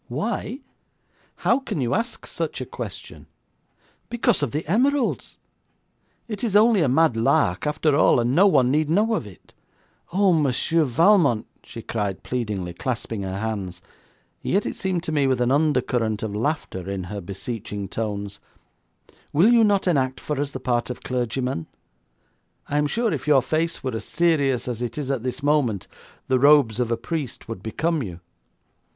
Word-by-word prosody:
'Why? 220 Hz, -, -3 dB, 0.8 s
How -, -, +4 dB
can 265 Hz, -, -4 dB
you 120 Hz, -3 st, 0 dB
ask 230 Hz, +2 st, -2 dB
such -, -, -4 dB
a -, -, -4 dB
question? -, -, -8 dB, 0.8 s
Because 235 Hz, -8 st, +1 dB
of 145 Hz, -, 0 dB
the 150 Hz, +7 st, -3 dB
emeralds. 260 Hz, -, +1 dB, 0.9 s
It 215 Hz, -2 st, -6 dB
is 215 Hz, -4 st, 0 dB
only 215 Hz, -1 st, +5 dB
a 145 Hz, -, +2 dB
mad 155 Hz, 0 st, +3 dB
lark, 115 Hz, -1 st, +2 dB
after 150 Hz, 0 st, +1 dB
all, 145 Hz, -, +4 dB
and 120 Hz, +1 st, +1 dB
no 190 Hz, +7 st, +6 dB
one 130 Hz, -9 st, +4 dB
need 150 Hz, +1 st, +1 dB
know 210 Hz, +7 st, +2 dB
of 155 Hz, -, -2 dB
it. 95 Hz, -5 st, -16 dB, 0.6 s
Oh, 190 Hz, +1 st, +3 dB
Monsieur 155 Hz, +2 st, +2 dB
Valmont,' 145 Hz, -, +3 dB, 0.2 s
she 115 Hz, -2 st, -9 dB
cried 100 Hz, -4 st, -3 dB
pleadingly, 105 Hz, -8 st, -3 dB
clasping 115 Hz, 0 st, -3 dB
her 95 Hz, 0 st, -4 dB
hands, 100 Hz, -5 st, -4 dB, 0.6 s
and -, -, -2 dB
yet 200 Hz, +2 st, +2 dB
it -, -, -3 dB
seemed 185 Hz, -3 st, -2 dB
to 160 Hz, -, -4 dB
me 145 Hz, -3 st, +2 dB
with 130 Hz, -2 st, +1 dB
an 125 Hz, +1 st, +2 dB
undercurrent 125 Hz, -7 st, +1 dB
of 105 Hz, -2 st, -3 dB
laughter 105 Hz, -, -2 dB
in 95 Hz, -1 st, -3 dB
her 100 Hz, +3 st, -6 dB
beseeching 100 Hz, +1 st, -5 dB
tones, 100 Hz, -1 st, -4 dB, 0.9 s
'will 185 Hz, +11 st, +5 dB
you 230 Hz, -1 st, +6 dB
not 205 Hz, -2 st, +3 dB
enact 130 Hz, -6 st, +1 dB
for 150 Hz, -2 st, -3 dB
us 145 Hz, -, -2 dB
the 135 Hz, -, -7 dB
part 120 Hz, -2 st, -1 dB
of 125 Hz, -, -6 dB
clergyman? 125 Hz, -6 st, -2 dB, 1.0 s
I 145 Hz, -, 0 dB
am 150 Hz, -, +2 dB
sure 230 Hz, +4 st, 0 dB
if 145 Hz, -1 st, -5 dB
your 140 Hz, -4 st, +5 dB
face 160 Hz, +3 st, -1 dB
were 130 Hz, -2 st, -2 dB
as 110 Hz, -, -4 dB
serious 145 Hz, -8 st, +1 dB
as 120 Hz, -2 st, -4 dB
it 120 Hz, +1 st, -4 dB
is 140 Hz, -2 st, -2 dB
at 135 Hz, -4 st, -1 dB
this 130 Hz, +3 st, -4 dB
moment, 140 Hz, -9 st, +1 dB, 0.4 s
the 130 Hz, -1 st, +2 dB
robes 140 Hz, -5 st, +5 dB
of 120 Hz, -1 st, 0 dB
a 115 Hz, -, +1 dB
priest 140 Hz, 0 st, -5 dB
would 115 Hz, -5 st, -6 dB
become 155 Hz, -, -1 dB
you.' 90 Hz, -7 st, -6 dB
130 Hz, 175 wpm, -23 LUFS, 115-165 Hz, 1.0 s, no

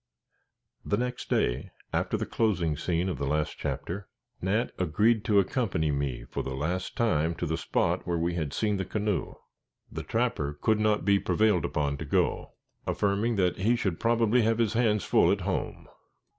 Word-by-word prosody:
The 105 Hz, -, 0 dB
next 125 Hz, +1 st, -3 dB
day, -, -, 0 dB, 0.2 s
after -, -, 0 dB
the -, -, -2 dB
closing 90 Hz, -9 st, 0 dB
scene 85 Hz, +3 st, -1 dB
of 85 Hz, -8 st, -3 dB
the 70 Hz, -, -1 dB
last 75 Hz, +1 st, -1 dB
chapter, 95 Hz, +2 st, -4 dB, 0.3 s
Nat 105 Hz, +6 st, 0 dB
agreed 105 Hz, +6 st, +2 dB
to 105 Hz, -, +3 dB
accompany 95 Hz, -, +1 dB
me 70 Hz, -3 st, -2 dB
for -, -, -4 dB
the 65 Hz, -, -4 dB
last 85 Hz, +7 st, -3 dB
time 85 Hz, -8 st, +1 dB
to 85 Hz, -, -3 dB
the 80 Hz, 0 st, -1 dB
spot 80 Hz, -, 0 dB
where 85 Hz, -1 st, 0 dB
we 85 Hz, +1 st, 0 dB
had 80 Hz, -5 st, -2 dB
seen 105 Hz, +4 st, 0 dB
the 95 Hz, -, -1 dB
canoe. 105 Hz, -4 st, -2 dB, 0.6 s
The -, -, -4 dB
trapper 75 Hz, +1 st, -1 dB
could 110 Hz, -1 st, +2 dB
not 105 Hz, -1 st, +2 dB
be 100 Hz, 0 st, +4 dB
prevailed 105 Hz, -5 st, +2 dB
upon 70 Hz, -1 st, -1 dB
to -, -, -6 dB
go, -, -, 0 dB, 0.3 s
affirming 105 Hz, +3 st, +1 dB
that 90 Hz, -3 st, +1 dB
he 110 Hz, +6 st, +2 dB
should 95 Hz, -7 st, -2 dB
probably 115 Hz, +1 st, +3 dB
have 115 Hz, 0 st, +2 dB
his 115 Hz, -2 st, +1 dB
hands 110 Hz, -4 st, +2 dB
full -, -, +4 dB
at -, -, 0 dB
home. -, -, -3 dB
95 Hz, 180 wpm, -28 LUFS, 80-110 Hz, 0.6 s, be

